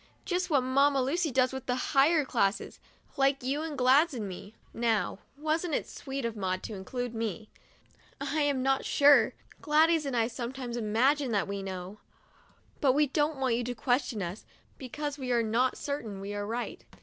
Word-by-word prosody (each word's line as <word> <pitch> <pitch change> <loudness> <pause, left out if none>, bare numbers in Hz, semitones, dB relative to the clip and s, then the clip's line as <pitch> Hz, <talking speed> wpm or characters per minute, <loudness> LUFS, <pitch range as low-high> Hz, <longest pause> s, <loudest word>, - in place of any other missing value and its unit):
Just 365 0 -1
what 280 -5 +3
Mamma 275 +2 +3
Lucy 310 +6 0
does 255 0 +2
with 265 -1 -6
the 250 - +1 0.2
higher 295 +2 +4
classes, 205 -5 -1 0.4
like 270 -1 +2
you 275 +4 -1
and 315 -2 -5
Gladys 270 +5 +4
and 215 -4 -4
me," 195 +3 -9
— - - -32 0.2
now, 215 -2 0 0.2
wasn't 315 +1 -1
it - - -2
sweet 270 -2 -5
of 230 -1 -3
Maud 185 -2 -2
to - - -6
include 240 +5 -5
me? 225 -2 -4 0.2
— - - -33
" - - -31
I 285 +2 -1
am 285 -3 +1
not 270 0 +2
sure. 280 -5 +5 0.3
Gladys 315 +1 +3
and 255 -3 -1
I 225 - +3
some 240 +1 -5
times 250 -3 -5
imagine 245 +5 +1
that 205 - +1
we 200 0 -4
know; 190 +1 -6 0.8
but 270 -3 +4
we 295 +2 +4
don't 295 +2 0
want 260 -3 +1
you 240 +1 0
to 245 +1 -4
question 245 -3 0
us, 175 +5 -6 0.4
because 290 +3 -5
we 255 -2 -3
are 235 -1 +3
not 235 +4 +1
certain 235 -9 -4
we 200 +1 -5
are 205 0 -3
right. 235 +2 -4
255 Hz, 195 wpm, -29 LUFS, 225-285 Hz, 0.8 s, sure